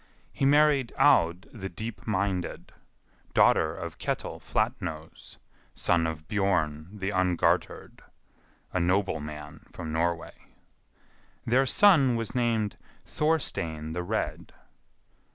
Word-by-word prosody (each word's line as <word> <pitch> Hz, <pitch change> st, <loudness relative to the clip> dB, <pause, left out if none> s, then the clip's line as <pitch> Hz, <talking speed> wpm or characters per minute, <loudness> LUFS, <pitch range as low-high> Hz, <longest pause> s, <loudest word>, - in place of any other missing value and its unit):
He 135 Hz, -, 0 dB
married 145 Hz, -3 st, +4 dB
Aud 85 Hz, +5 st, +4 dB
the 95 Hz, -5 st, -6 dB
Deep 110 Hz, +7 st, -7 dB
minded, 95 Hz, -3 st, -2 dB, 0.6 s
daughter -, -, +4 dB
of -, -, -7 dB
Ketil -, -, -3 dB
Flatnose, 90 Hz, -8 st, -4 dB, 0.4 s
son 85 Hz, -2 st, +2 dB
of 80 Hz, -1 st, -6 dB
Bjorn 85 Hz, -6 st, 0 dB
the 100 Hz, -1 st, -4 dB
Ungartered, 95 Hz, -2 st, 0 dB, 0.7 s
a 90 Hz, -, +1 dB
noble 90 Hz, 0 st, +1 dB
man 75 Hz, +1 st, -9 dB
from 80 Hz, -2 st, -6 dB
Norway. 85 Hz, +1 st, -1 dB, 1.1 s
Their 130 Hz, +3 st, +3 dB
son 140 Hz, -7 st, +5 dB
was 115 Hz, -2 st, -3 dB
named 115 Hz, -4 st, 0 dB, 0.3 s
Thorstein 85 Hz, -, -1 dB
the 90 Hz, -, -2 dB
Red. 90 Hz, -, -3 dB
95 Hz, 105 wpm, -28 LUFS, 80-115 Hz, 1.1 s, son